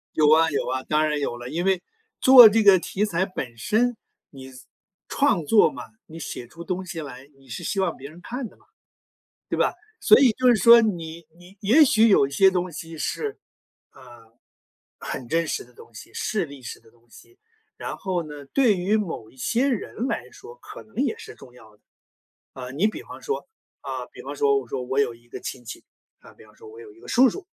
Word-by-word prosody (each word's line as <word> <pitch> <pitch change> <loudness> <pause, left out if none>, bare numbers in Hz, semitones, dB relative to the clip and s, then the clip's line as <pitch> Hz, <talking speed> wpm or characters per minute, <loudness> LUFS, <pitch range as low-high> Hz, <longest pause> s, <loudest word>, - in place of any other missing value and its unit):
有 150 -1 +4
啊 160 +1 +4
有 145 - -2
啊， 130 0 -2
当 155 +2 +1
然 150 -1 -1
有 130 -4 -3
了， 120 +1 -8
因 170 +5 -3
为 190 -2 +1 0.4
做 255 -3 +10
这 220 +1 +2
个 195 -2 +7
题 195 +3 -3
材 190 -2 -1
本 130 -11 -7
身， 225 - 0 0.3
你 130 -2 -12 0.6
创 220 - +1
作 210 +8 +5
嘛， - - -9 0.2
你 160 - -12
写 125 -6 -7
出 165 +8 -11
东 185 +1 -4
西 170 -2 -6
来， 135 -1 -10
你 135 -1 -22
是 115 - -7
希 195 - -1
望 180 -4 -1
别 140 +1 -10
人 165 +3 -15
看 245 +5 -6
的 - - -21
嘛。 - - -28 0.8
对 - - -3
吧， - - +1 0.3
所 - - +6
以 265 -4 +5
就 255 +4 0
是 240 - +5
说 235 +3 +7
你 170 -6 -4
你 175 +2 -17
也 255 +10 +5
许 225 -3 +4
有 140 -9 +4
一 - - -12
些 190 +7 +5
东 180 -1 -2
西 165 +1 -9
是， 425 - -4 0.5
呃， 120 -4 -17 0.7
很 125 - -6
真 165 +4 0
实 - - -3
的 125 - -21
东 120 - -17
西， 105 - -12
是 215 -6 -2
历 140 -3 -13
史 120 - -8
的 115 - -23
东 120 +1 -30
西， 365 - -18 0.4
然 - - -5
后 185 -3 -3
呢， 150 -2 -10
对 245 - +2
于 190 +4 +1
某 170 - -5
一 130 - -23
些 240 - 0
人 240 0 -3
来 - - -3
说 460 +3 -13
可 - - -12
能 220 - -21
也 280 - 0
是 440 -1 -11
重 125 - -16
要 110 -3 -18
的。 - - -45 0.7
啊， 125 -1 -8
你 160 +10 +1
比 215 - -6
方 - - -12
说 440 - -4 0.3
啊， - - -6
比 - - -13
方 - - -7
说 425 -1 +2
我 410 - -5
说 - - -4
我 130 +2 -2
有 140 -4 +1
一 120 +1 -21
个 - - -9
亲 125 - -7
戚， 115 - -10 0.4
啊， - - -17
比 - - -18
方 - - -21
说 445 - -15
我 445 +1 -12
有 430 -1 -13
一 360 - -20
个 - - -15
叔 255 +2 +5
叔， 385 +6 -9
175 Hz, 240 characters per minute, -24 LUFS, 135-230 Hz, 0.8 s, 做